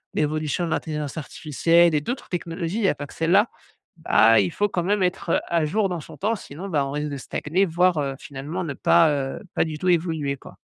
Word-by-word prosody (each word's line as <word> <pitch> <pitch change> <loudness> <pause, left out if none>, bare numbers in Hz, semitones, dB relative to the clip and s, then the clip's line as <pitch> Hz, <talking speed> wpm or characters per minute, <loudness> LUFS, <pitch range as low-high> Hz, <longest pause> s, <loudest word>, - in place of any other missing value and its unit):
l'évolution 155 +2 0
de - - -4
l'intelligence 150 -1 -3
artificielle 165 +2 +2
et 150 - +2
d'autres 245 - -5
technologies, 170 +2 -3
il 225 - -1
y 195 - +4
a - - +2
pas 145 - -7
que - - -14
celle-là, 190 +7 +3 0.5
bah, 115 -8 +5
il 95 -3 +1
faut 205 0 0
quand 175 -3 -1
même 205 +2 +1
être, 180 -2 -1
heu, - - +3
à 165 -2 +1
jour 195 +4 +1
dans 175 -2 -3
son - - -12
temps. 215 +4 0
Sinon, 185 -1 -8
ben, 150 -5 +1
on 135 - -5
risque 150 +1 -2
de 140 - -4
stagner, 170 +8 -1
voire, 175 0 +2
heu, 140 -2 -1
finalement, 150 +6 -5
ne 145 -5 -4
pas, 85 - +4
heu, 135 -2 -3
pas - - +3
du 155 -2 -4
tout 185 - -2
évoluer, 160 -5 +1
quoi. - - -14
160 Hz, 235 wpm, -24 LUFS, 145-180 Hz, 0.5 s, bah